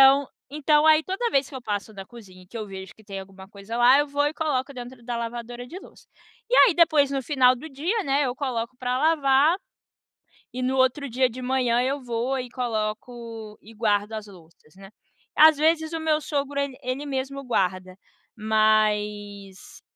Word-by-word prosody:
Então 270 Hz, +1 st, +6 dB, 0.2 s
então, 300 Hz, +2 st, +2 dB
aí 315 Hz, 0 st, +6 dB
toda 390 Hz, +8 st, -2 dB
vez 275 Hz, -, +1 dB
que 275 Hz, -, -9 dB
eu -, -, -7 dB
passo 205 Hz, -1 st, -4 dB
da 195 Hz, -2 st, -9 dB
cozinha 185 Hz, -6 st, -14 dB
que 235 Hz, -, -10 dB
eu 215 Hz, -2 st, -5 dB
vejo 190 Hz, -1 st, -9 dB
que 220 Hz, -, -20 dB
tem 200 Hz, -2 st, -7 dB
alguma 190 Hz, 0 st, -13 dB
coisa 200 Hz, +3 st, -8 dB
lá, 245 Hz, +3 st, +6 dB
eu 290 Hz, -, +2 dB
vou 290 Hz, 0 st, 0 dB
e -, -, -6 dB
coloco 280 Hz, -4 st, -2 dB
dentro 245 Hz, -1 st, -10 dB
da 240 Hz, 0 st, -3 dB
lavadora 240 Hz, +1 st, -6 dB
de 335 Hz, -, -10 dB
louça. -, -, -17 dB, 0.4 s
E -, -, +1 dB
aí, 445 Hz, -, +7 dB
depois, 310 Hz, -5 st, +4 dB
no 275 Hz, -1 st, -1 dB
final 255 Hz, -2 st, +3 dB
do 310 Hz, +6 st, -9 dB
dia, 340 Hz, +10 st, -2 dB
né, 275 Hz, 0 st, +1 dB
eu 250 Hz, -2 st, -2 dB
coloco 250 Hz, -3 st, -3 dB
para 250 Hz, 0 st, -1 dB
lavar. 295 Hz, +1 st, +3 dB, 1.0 s
E, 255 Hz, -, -4 dB
no 260 Hz, +1 st, 0 dB
outro 260 Hz, +2 st, +1 dB
dia 255 Hz, +2 st, +2 dB
de 250 Hz, +1 st, -8 dB
manhã, 250 Hz, -2 st, +1 dB
eu 270 Hz, +3 st, -1 dB
vou 245 Hz, +1 st, -2 dB
e 250 Hz, -1 st, -6 dB
coloco 225 Hz, -1 st, -5 dB
e 225 Hz, -, -14 dB
guardo 210 Hz, -1 st, 0 dB
as 215 Hz, -1 st, -6 dB
louças, 170 Hz, -4 st, -18 dB
né. 195 Hz, +1 st, -14 dB, 0.4 s
Às 310 Hz, 0 st, +7 dB
vezes, 320 Hz, +1 st, +2 dB
o 325 Hz, -, -2 dB
meu 310 Hz, -1 st, +1 dB
sogro 285 Hz, -1 st, -2 dB
ele 280 Hz, -2 st, -3 dB
ele 255 Hz, +3 st, -3 dB
mesmo 275 Hz, 0 st, -4 dB
guarda, 185 Hz, -6 st, -1 dB, 0.4 s
mas 210 Hz, -2 st, 0 dB
250 Hz, 190 wpm, -24 LUFS, 215-280 Hz, 1.0 s, aí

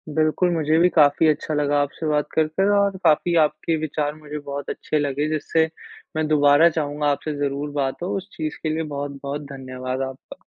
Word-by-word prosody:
बिल्कुल, 160 Hz, +3 st, +2 dB
मुझे 160 Hz, -2 st, +1 dB
भी 175 Hz, +1 st, +5 dB
काफ़ी 150 Hz, -1 st, +4 dB
अच्छा 155 Hz, 0 st, 0 dB
लगा 145 Hz, -1 st, +1 dB
आपसे 145 Hz, +3 st, -4 dB
बात 150 Hz, -1 st, +1 dB
कर 155 Hz, -1 st, +2 dB
कर, 195 Hz, +6 st, +1 dB
और 200 Hz, -1 st, +2 dB
काफ़ी 170 Hz, +3 st, +3 dB
आपके 160 Hz, +2 st, -1 dB
विचार 150 Hz, -1 st, -2 dB
मुझे 150 Hz, -1 st, -7 dB
बहुत 140 Hz, -1 st, -6 dB
अच्छे 155 Hz, -, -2 dB
लगे, 145 Hz, +1 st, -1 dB
जिससे 160 Hz, +1 st, +1 dB, 0.5 s
मैं 155 Hz, 0 st, 0 dB
दोबारा 145 Hz, +2 st, +5 dB
चाहूँगा 145 Hz, 0 st, -1 dB
आपसे 150 Hz, +2 st, -3 dB
ज़रूर 145 Hz, +1 st, -2 dB
बात 140 Hz, 0 st, -2 dB
हो। 180 Hz, -, -2 dB
उस 190 Hz, +1 st, -7 dB
चीज़ 155 Hz, 0 st, -4 dB
के 160 Hz, -, 0 dB
लिए 160 Hz, 0 st, -1 dB
बहुत-बहुत 140 Hz, 0 st, -4 dB
धन्यवाद 130 Hz, -1 st, -5 dB
आपका। 130 Hz, -, -12 dB
150 Hz, 190 wpm, -23 LUFS, 145-160 Hz, 0.5 s, भी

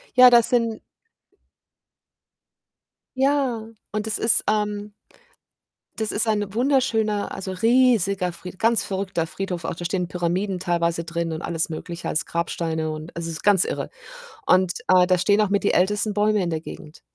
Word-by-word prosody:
Ja, 250 Hz, 0 st, +9 dB
das 240 Hz, -2 st, +5 dB
sind 230 Hz, -3 st, 0 dB, 2.4 s
Ja, 265 Hz, -5 st, +1 dB, 0.2 s
und 215 Hz, 0 st, -3 dB
das 220 Hz, -, -2 dB
ist, 225 Hz, -, +3 dB
ähm 210 Hz, -1 st, -1 dB, 1.0 s
das 220 Hz, -1 st, -2 dB
ist 220 Hz, +2 st, -1 dB
ein 205 Hz, -2 st, -1 dB
wunderschöner, 225 Hz, -5 st, +1 dB
also, 190 Hz, 0 st, -5 dB
riesiger, 200 Hz, -3 st, +2 dB
Fried 180 Hz, +2 st, -10 dB
ganz 230 Hz, 0 st, +3 dB
verrückter 190 Hz, -3 st, -2 dB
Friedhof. 180 Hz, 0 st, -5 dB
Auch -, -, -2 dB
da 175 Hz, -, -8 dB
stehen 180 Hz, 0 st, -1 dB
Pyramiden 180 Hz, +2 st, -2 dB
teilweise 170 Hz, -2 st, 0 dB
drin 170 Hz, 0 st, -3 dB
und 160 Hz, +1 st, -5 dB
alles 165 Hz, -1 st, -1 dB
Mögliche 170 Hz, +2 st, -6 dB
als 155 Hz, -, 0 dB
Grabsteine 165 Hz, -2 st, -2 dB
und 155 Hz, +2 st, -8 dB
also, 170 Hz, 0 st, -4 dB
es 165 Hz, -, -4 dB
ist -, -, -12 dB
ganz 205 Hz, -3 st, +5 dB
irre -, -, -4 dB, 0.6 s
und, 185 Hz, -1 st, +4 dB
äh, 185 Hz, -1 st, +5 dB
da 185 Hz, 0 st, +2 dB
stehen 205 Hz, +3 st, +3 dB
auch 210 Hz, -, +1 dB
mit 200 Hz, 0 st, +1 dB
die 205 Hz, -, +2 dB
ältesten 205 Hz, +3 st, +1 dB
Bäume 210 Hz, 0 st, +2 dB
in 175 Hz, -, -1 dB
der 160 Hz, -2 st, -2 dB
Gegend. 155 Hz, -1 st, -11 dB
195 Hz, 165 wpm, -23 LUFS, 170-215 Hz, 2.4 s, Ja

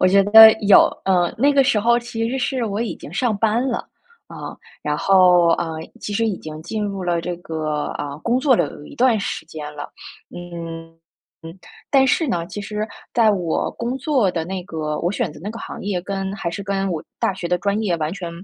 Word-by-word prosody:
我 185 Hz, -, +5 dB
觉 195 Hz, +1 st, +5 dB
得 220 Hz, +2 st, +10 dB
有。 200 Hz, 0 st, +7 dB, 0.2 s
呃， 180 Hz, -2 st, +2 dB
那 280 Hz, +5 st, +3 dB
个 275 Hz, -1 st, +5 dB
时 255 Hz, -4 st, +2 dB
候 235 Hz, +3 st, +3 dB
其 230 Hz, -1 st, -3 dB
实 265 Hz, -, -2 dB
是 255 Hz, -1 st, -1 dB
我 210 Hz, 0 st, -3 dB
已 235 Hz, -, -3 dB
经 150 Hz, -, -11 dB
上 220 Hz, 0 st, 0 dB
班 225 Hz, +3 st, +1 dB
了， 240 Hz, -, -1 dB, 0.5 s
啊， -, -, -8 dB, 0.3 s
然 150 Hz, 0 st, -1 dB
后， 180 Hz, -1 st, +5 dB
呃， 165 Hz, -1 st, -3 dB, 0.2 s
其 -, -, -6 dB
实 225 Hz, +2 st, +1 dB
已 205 Hz, -5 st, -2 dB
经 155 Hz, 0 st, -8 dB
进 210 Hz, +5 st, -4 dB
入 195 Hz, -2 st, -3 dB
了 175 Hz, -1 st, 0 dB
这 175 Hz, 0 st, -4 dB
个， 155 Hz, -3 st, -3 dB
呃， 145 Hz, 0 st, -5 dB
工 240 Hz, +2 st, 0 dB
作 260 Hz, -4 st, +4 dB
了 -, -, +2 dB
有 145 Hz, -, -12 dB
一 -, -, -12 dB
段 235 Hz, -4 st, +3 dB
时 165 Hz, -, -4 dB
间 155 Hz, -2 st, -8 dB
了。 145 Hz, -, -5 dB, 0.5 s
嗯， 165 Hz, -2 st, -8 dB, 0.5 s
嗯。 165 Hz, +3 st, -10 dB, 0.3 s
但 270 Hz, -1 st, +5 dB
是 320 Hz, +5 st, +2 dB
呢， 170 Hz, -10 st, -1 dB
其 205 Hz, -, -8 dB
实 210 Hz, +1 st, -4 dB, 0.2 s
在 220 Hz, -3 st, +4 dB
我 175 Hz, -5 st, -1 dB
工 245 Hz, +3 st, -4 dB
作 260 Hz, -, +1 dB
的 165 Hz, -2 st, -3 dB
那 185 Hz, -1 st, -5 dB
个 155 Hz, -4 st, -4 dB
我 175 Hz, +3 st, 0 dB
选 215 Hz, -7 st, -1 dB
择 150 Hz, -, -12 dB
那 205 Hz, -, -4 dB
个 230 Hz, -, -8 dB
行 -, -, -8 dB
业 195 Hz, -3 st, -2 dB
跟 195 Hz, +1 st, -4 dB
还 180 Hz, -4 st, -3 dB
是 190 Hz, +4 st, -5 dB
跟 195 Hz, -1 st, -1 dB
我 160 Hz, -3 st, -4 dB, 0.2 s
大 195 Hz, -, +1 dB
学 175 Hz, -, -5 dB
的 180 Hz, 0 st, 0 dB
专 200 Hz, +3 st, 0 dB
业 185 Hz, -5 st, 0 dB
完 155 Hz, 0 st, -1 dB
全 180 Hz, -4 st, -6 dB
195 Hz, 240 characters per minute, -21 LUFS, 170-225 Hz, 0.5 s, 得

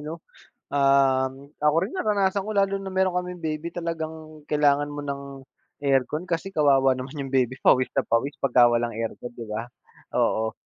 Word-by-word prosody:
'no? 155 Hz, +3 st, -7 dB, 0.5 s
Um, 135 Hz, -1 st, +2 dB
ako 150 Hz, +1 st, +3 dB
rin 220 Hz, -, -11 dB
naranasan 200 Hz, -, +1 dB
ko 215 Hz, -, -5 dB
lalo 200 Hz, -1 st, +2 dB
na 195 Hz, 0 st, -6 dB
meron 190 Hz, -1 st, +1 dB
kaming 180 Hz, 0 st, -3 dB
baby 155 Hz, 0 st, -3 dB
talagang 160 Hz, -2 st, -5 dB
kailangan 145 Hz, -1 st, +3 dB
mo 145 Hz, 0 st, -5 dB
ng 140 Hz, -1 st, -4 dB, 0.6 s
aircon, 140 Hz, +3 st, +1 dB
kasi 170 Hz, +3 st, -2 dB
kawawa 135 Hz, -5 st, +4 dB
naman 130 Hz, +3 st, -6 dB
yung 135 Hz, -, -8 dB
baby 130 Hz, -1 st, +1 dB
pawis 130 Hz, 0 st, +4 dB
na 135 Hz, -, +2 dB
pawis 125 Hz, +5 st, 0 dB
pagka 125 Hz, -2 st, +5 dB
walang 120 Hz, 0 st, 0 dB
aircon, 115 Hz, +2 st, -5 dB
'di 120 Hz, -1 st, -8 dB
ba? 110 Hz, +3 st, -4 dB, 0.5 s
Oo. 110 Hz, 0 st, +1 dB
145 Hz, 170 wpm, -25 LUFS, 130-165 Hz, 0.6 s, pagka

